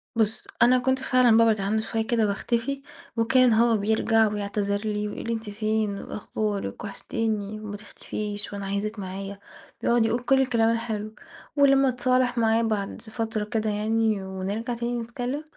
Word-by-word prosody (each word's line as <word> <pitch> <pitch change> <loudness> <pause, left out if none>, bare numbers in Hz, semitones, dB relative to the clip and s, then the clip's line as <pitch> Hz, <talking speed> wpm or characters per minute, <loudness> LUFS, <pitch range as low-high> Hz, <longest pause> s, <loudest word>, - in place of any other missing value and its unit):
بُصّ، 220 -1 0
أنا 250 +2 +6
كنت 260 +1 +1
فعلًا 255 -3 +4
بابعد 225 -3 +4
عنه 215 +3 0
شوية 225 0 -2
كده، 230 -3 +2
وأختفي، 235 +7 -1 0.4
وكان 245 +1 +4
هو 230 0 +4
بيرجع 220 +1 +3
ويعتذر 205 -1 -1
لي، 210 -1 -1
ويقول 210 - -6
لي: 230 - 0
أنتِ 225 -2 -5
فين، 215 -1 -1
وأخبارِك؟ 210 -1 -4
وحشتيني، 215 0 -3
وما 210 -1 -6
تختفيش، 205 0 -6
وأنا 200 -1 -5
عايزِك 205 +2 -3
معايا، 195 +1 -6 0.4
بيقعد 235 -1 +3
يقول 235 +2 0
كل 270 +2 +4
الكلام 235 -4 +2
الحلو، 220 -2 -3 0.4
ولمّا 275 -1 +5
اتصالح 255 0 +1
معاه 225 0 +3
بعد 215 -3 -2
فترة 225 -1 -3
كده 215 0 -1
يعني، 215 -1 +1
ونرجع 195 +6 -3
تاني 235 0 -2
نتكلم، 245 +5 -4
220 Hz, 155 wpm, -26 LUFS, 210-235 Hz, 0.4 s, أنا